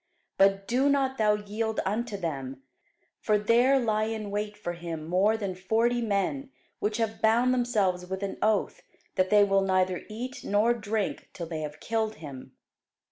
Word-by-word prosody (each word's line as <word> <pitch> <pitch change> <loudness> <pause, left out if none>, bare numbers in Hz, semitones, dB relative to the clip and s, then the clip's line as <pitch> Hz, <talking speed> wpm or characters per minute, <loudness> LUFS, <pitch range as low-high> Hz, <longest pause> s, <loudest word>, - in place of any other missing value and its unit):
But 195 0 +4
do 260 +4 +2
not 270 -2 +1
thou 210 -1 +4
yield 215 +2 -3
unto 215 +2 -2
them: 135 -7 -5 0.6
for 215 -1 +2
there 240 +6 +4
lie 215 -3 +1
in 215 -2 -4
wait 210 0 -3
for 175 -4 -4
him 170 -2 -6
more 195 +6 +3
than 200 -4 -3
forty 225 +6 +1
men, 195 - -1 0.3
which 210 +1 -1
have 225 -1 -2
bound 235 +3 +4
themselves 205 -8 0
with 190 +1 -4
an 195 - -3
oath, 215 -1 +1 0.3
that 185 -1 +1
they 210 -1 +6
will 195 -1 +3
neither 185 -1 +1
eat 245 +4 -6
nor 210 +4 +3
drink 215 -2 -3
till 170 - -5
they 160 -1 -5
have 150 0 -6
killed 220 +1 -1
him. 140 -7 -10
210 Hz, 170 wpm, -28 LUFS, 185-225 Hz, 0.6 s, they